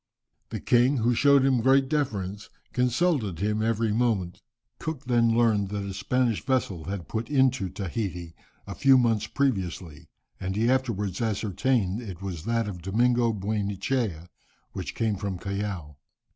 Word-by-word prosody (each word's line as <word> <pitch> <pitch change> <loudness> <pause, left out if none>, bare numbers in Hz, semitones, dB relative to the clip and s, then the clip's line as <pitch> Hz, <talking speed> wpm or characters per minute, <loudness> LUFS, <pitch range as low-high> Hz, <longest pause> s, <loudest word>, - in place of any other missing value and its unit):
The - - -4
king, 125 +3 +3
who 120 +1 +2
showed 140 +2 +5
him 130 -3 +3
great 135 +2 +4
deference, 105 -9 -2 0.2
consulted 125 - +1
him 105 +4 0
every 115 0 +1
moment. 105 -6 0 0.4
Cook 150 -4 -5
then 115 -2 +3
learned 110 -4 +2
that 100 0 -3
a 100 - -5
Spanish 120 +3 0
vessel 105 - -1
had 95 -4 -5
put 110 +1 -4
into 130 -8 +2
Tahiti 95 -3 -4 0.3
a - - -6
few 135 -1 +5
months 115 -3 +2
previously, 95 - -2 0.3
and 95 +1 -3
he 115 +4 +2
afterwards 110 -8 -1
ascertained 110 -1 0
that 115 -4 -7
it 90 -1 -8
was 90 -4 -5
that 115 -1 0
of 90 -4 -6
Domingo 120 +5 +2
Buenechea, 100 -2 -2 0.4
which - - -6
came 110 -3 0
from 100 -1 -3
Callao. 95 -6 -4
110 Hz, 150 wpm, -26 LUFS, 95-125 Hz, 0.4 s, showed